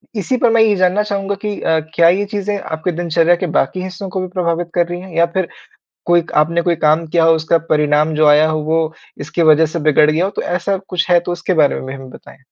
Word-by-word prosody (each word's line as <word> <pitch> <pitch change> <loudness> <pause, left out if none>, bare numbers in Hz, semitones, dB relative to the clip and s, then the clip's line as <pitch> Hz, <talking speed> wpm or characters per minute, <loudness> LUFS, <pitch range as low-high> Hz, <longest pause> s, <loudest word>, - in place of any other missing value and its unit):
इसी 210 +5 -1
पर 245 -1 +2
मैं 230 - +4
ये 215 -2 +3
जानना 185 +2 +1
चाहूँगा 200 -1 -3
कि 210 -1 -3
अ, 160 0 +1 0.2
क्या 170 0 +5
ये 195 +4 +1
चीज़ें 205 0 -3
आपकी 160 0 -4
दिनचर्या 170 0 +1
के 180 +1 -4
बाकी 185 +7 -2
हिस्सों 185 +1 -7
को 190 0 -4
भी 185 - -4
प्रभावित 175 -1 -2
कर 175 -1 +2
रही 175 0 -5
हैं? 190 0 -12
या 170 - +5
फ़िर 170 +1 -3 0.6
कोई 175 0 +3
क - - -10
आपने 170 +3 +2
कोई 170 0 0
काम 155 +1 +1
किया 165 +1 +1
हो 165 0 +5
उसका 160 +1 +1
परिणाम 150 +1 +1
जो 155 0 +3
आया 150 +1 +5
हो 155 0 -1
वो 160 +1 -1 0.3
इसकी 150 +4 -3
वजह 155 0 +5
से 160 +2 -4
बिगड़ 150 0 +3
गया 165 +4 0
हो 195 - -3
तो - - -4
ऐसा 185 +3 -2
कुछ 180 0 -2
है, 175 -1 +5
तो 175 +1 -6
उसके 175 +1 -2
बारे 155 -4 +2
में - - -6
भी 130 - -6
हमें 135 -1 -10
बताएँ। 130 - -15
170 Hz, 260 wpm, -16 LUFS, 155-185 Hz, 0.6 s, क्या